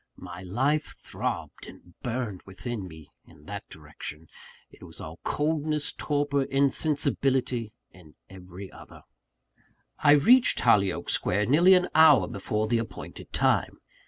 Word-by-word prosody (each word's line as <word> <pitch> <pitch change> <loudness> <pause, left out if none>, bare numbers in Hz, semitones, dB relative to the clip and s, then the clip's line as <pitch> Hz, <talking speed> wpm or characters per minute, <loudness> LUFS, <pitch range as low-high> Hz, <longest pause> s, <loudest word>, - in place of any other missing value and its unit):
My 90 -1 -9
life 130 +11 -1
throbbed - - -5
and 90 - -15
burned 115 -6 -4
within 100 +1 -6
me, 80 -3 -14 0.2
in 75 0 -19
that - - -8
direction: 75 +2 -10 0.4
it - - -19
was - - -9
all 80 +2 -9
coldness, 150 -1 -1
torpor, 145 -1 -1
insensibility, 135 -3 +1 0.2
in 85 -5 -18
every 95 0 -11
other. - - -14 1.0
I 145 -1 +5
reached 235 - +5
Hollyoake 100 -3 +2
Square 105 +3 0
nearly 170 - +5
an 180 -1 +2
hour 155 -2 +6
before 110 -2 -2
the 115 +1 +1
appointed 115 - -8
time. - - +1
120 Hz, 130 wpm, -26 LUFS, 95-145 Hz, 1.0 s, hour